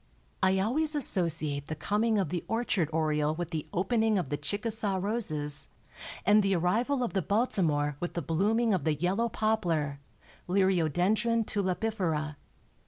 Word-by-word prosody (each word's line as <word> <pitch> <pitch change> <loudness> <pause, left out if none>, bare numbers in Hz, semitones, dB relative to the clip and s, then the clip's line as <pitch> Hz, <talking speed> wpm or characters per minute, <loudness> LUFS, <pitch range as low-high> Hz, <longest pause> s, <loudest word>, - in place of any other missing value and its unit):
I 190 0 +3
always 295 +11 +1
associate 160 - +3
the 155 - -4
coming 215 +7 0
of 190 -6 0
the 175 0 -3
orchard 225 -8 0
oriole 155 -1 0
with 175 0 -5
the 155 -3 -4
opening 220 +3 +1
of 170 -8 -3
the - - +1
Chickasaw 205 +5 -2
roses, 155 -9 -1 0.6
and 210 +2 +5
the 195 -1 +1
arrival 235 +10 0
of 240 - -3
the 195 - +1
Baltimore 160 - 0
with 175 - -4
the 170 - -1
blooming 210 - +1
of 180 -6 0
the 155 0 +1
yellow 190 +9 0
poplar 170 -11 -1 0.5
(Liriodendron 190 +5 +1
tulipifera). 185 -7 -1
190 Hz, 145 wpm, -29 LUFS, 155-220 Hz, 0.6 s, and